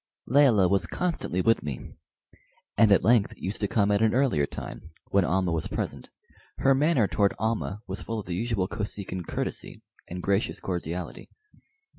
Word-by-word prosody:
Layelah 125 Hz, -8 st, +5 dB
was 95 Hz, -1 st, +1 dB
constantly 170 Hz, -, -1 dB
with 115 Hz, +4 st, +3 dB
me, 70 Hz, -4 st, -6 dB, 0.8 s
and 110 Hz, -2 st, +5 dB
at 100 Hz, -, +5 dB
length 115 Hz, -3 st, +3 dB
used 95 Hz, +4 st, -4 dB
to 105 Hz, -, +1 dB
come 100 Hz, 0 st, +2 dB
at 100 Hz, +1 st, +2 dB
an 110 Hz, +1 st, +3 dB
earlier 125 Hz, -, +2 dB
time, 80 Hz, -, -8 dB, 0.2 s
when 100 Hz, -1 st, +4 dB
Almah 90 Hz, 0 st, +1 dB
was 80 Hz, -2 st, -1 dB
present. -, -, -4 dB, 0.5 s
Her 135 Hz, -, +4 dB
manner 135 Hz, -5 st, +3 dB
toward 100 Hz, 0 st, +1 dB
Almah 110 Hz, -2 st, -2 dB
was 95 Hz, +1 st, -5 dB
full 115 Hz, -, -4 dB
of 105 Hz, -, -7 dB
the 90 Hz, -, -4 dB
usual 105 Hz, -2 st, -1 dB
Kosekin 100 Hz, -4 st, -5 dB
courtesy -, -, -4 dB, 0.2 s
and 90 Hz, +1 st, -6 dB
gracious 100 Hz, +2 st, 0 dB
cordiality. 85 Hz, -2 st, -5 dB
100 Hz, 165 wpm, -27 LUFS, 90-115 Hz, 0.8 s, Layelah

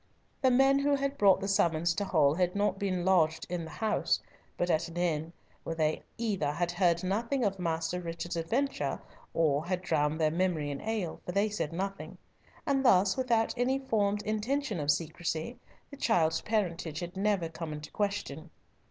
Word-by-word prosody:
The 260 Hz, -, +5 dB
men 270 Hz, +2 st, +5 dB
who 285 Hz, 0 st, +2 dB
had 275 Hz, 0 st, -1 dB
brought 200 Hz, -5 st, +5 dB
the 195 Hz, -, -2 dB
summons 170 Hz, -3 st, +2 dB
to 205 Hz, -, -2 dB
Hull 150 Hz, -6 st, +3 dB
had 180 Hz, +2 st, 0 dB
not 200 Hz, -1 st, +1 dB
been 185 Hz, -3 st, -1 dB
lodged 160 Hz, -4 st, +3 dB
in 175 Hz, -2 st, -2 dB
the -, -, -8 dB
house, 220 Hz, +6 st, 0 dB, 0.4 s
but 175 Hz, 0 st, +1 dB
at 165 Hz, +2 st, +1 dB
an 170 Hz, +1 st, -9 dB
inn, 165 Hz, -2 st, 0 dB, 0.3 s
where 165 Hz, -, -4 dB
they 155 Hz, -1 st, 0 dB, 0.2 s
either 200 Hz, -11 st, 0 dB
had 175 Hz, +2 st, -1 dB
heard 175 Hz, -1 st, +2 dB
nothing 230 Hz, +8 st, 0 dB
of 195 Hz, -2 st, 0 dB
Master 165 Hz, +1 st, -1 dB
Richard's 170 Hz, 0 st, -5 dB
adventure 240 Hz, +12 st, -1 dB, 0.4 s
or 155 Hz, -2 st, +2 dB
had 180 Hz, 0 st, -1 dB
drowned 155 Hz, -3 st, +1 dB
their 155 Hz, -1 st, +3 dB
memory 165 Hz, -4 st, 0 dB
in 140 Hz, -, -5 dB
ale, 215 Hz, -6 st, -3 dB
for 180 Hz, -, -5 dB
they 200 Hz, +3 st, +2 dB
said 205 Hz, -7 st, -3 dB
nothing; 195 Hz, +3 st, -4 dB, 0.5 s
and 275 Hz, -1 st, +1 dB
thus, 190 Hz, -5 st, +5 dB
without 235 Hz, -4 st, +1 dB
any 250 Hz, +2 st, +1 dB
formed 210 Hz, -6 st, 0 dB
intention 220 Hz, -, -1 dB
of 145 Hz, -1 st, -2 dB
secrecy, 165 Hz, +8 st, -1 dB, 0.3 s
the 280 Hz, -, -9 dB
child's 165 Hz, -11 st, +2 dB
parentage 175 Hz, -7 st, -1 dB
had 175 Hz, +1 st, -6 dB
never 195 Hz, -3 st, +1 dB
come 165 Hz, -1 st, -6 dB
into 150 Hz, 0 st, -7 dB
question. 200 Hz, -6 st, -3 dB
180 Hz, 180 wpm, -30 LUFS, 165-215 Hz, 0.5 s, The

